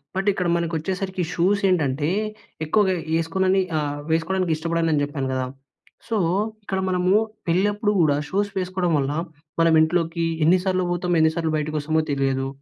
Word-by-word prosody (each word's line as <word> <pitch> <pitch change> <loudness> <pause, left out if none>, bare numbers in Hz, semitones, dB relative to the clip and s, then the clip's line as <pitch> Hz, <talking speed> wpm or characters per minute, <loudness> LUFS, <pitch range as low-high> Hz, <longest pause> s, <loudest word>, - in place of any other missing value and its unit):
But 195 +2 -1
ఇక్కడ 180 -2 -1
మనకు 170 -1 -1
వచ్చేసరికి 185 +2 -3
షూస్ 195 +4 +2
ఏంటంటే 150 -3 +1 0.6
ఎక్కువగా 190 +3 +2 0.2
వేసుకోనని 185 +4 +1 0.2
ఆహ్, 145 -1 -2
వేసుకోవడానికి 175 +1 +1
ఇష్టపడను 165 0 0
అని 145 - +2
చెప్పాను 145 -2 -3
కదా! 130 0 -1 0.6
సో, 225 - 0 0.5
ఇక్కడ 190 -1 -2
మనము 180 0 +1 0.4
పెళ్లి 185 +4 +3
అప్పుడు 210 0 0
కూడా 150 -3 +3
షూస్ 205 +2 0
వేసుకోవడం 185 -1 -1
వల్ల 140 0 0 0.5
మన 165 0 +4
ఇంట్లోకి 165 +1 +1 0.2
ఎన్ని 175 +4 +5
సార్లు 185 -1 +1
పోతామో, 175 0 0
ఎన్ని 160 0 +4
సార్లు 165 -2 -1
బయటకు 155 +1 -3
వస్తామో 155 +2 +1
తెలియదు. 135 -1 0
170 Hz, 155 wpm, -23 LUFS, 155-185 Hz, 0.6 s, ఎన్ని